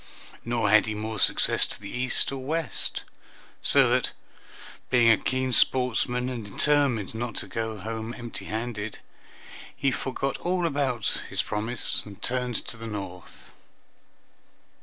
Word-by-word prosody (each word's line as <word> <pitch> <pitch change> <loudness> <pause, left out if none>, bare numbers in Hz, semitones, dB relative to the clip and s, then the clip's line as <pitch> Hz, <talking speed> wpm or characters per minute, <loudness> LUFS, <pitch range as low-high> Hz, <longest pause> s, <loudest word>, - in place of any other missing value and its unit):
Nor 115 -3 0
had 110 0 +5
he 110 - -3
more 110 0 -4
success - - +4
to - - -3
the 100 -1 -9
east 130 +2 +3
or 135 -1 -6
west, 160 +3 -3 0.6
so 135 -2 +5
that, 125 0 +1 0.8
being 120 -2 +5
a - - +6
keen 130 0 -1
sportsman, 125 0 +2
and 125 -3 -4
determined 120 -1 +1
not 115 0 -4
to - - -4
go 110 -1 -4
home 110 +3 -5
empty 115 -5 -7
handed, 110 -1 -4 0.8
he 135 - 0
forgot 135 +1 -3
all 180 0 -1
about 140 -7 0
his - - 0
promise 110 +4 +3
and 100 -2 -12
turned 125 -1 -1
to 120 - -5
the 115 0 -7
north. 95 -4 -8
120 Hz, 140 wpm, -26 LUFS, 110-130 Hz, 0.8 s, a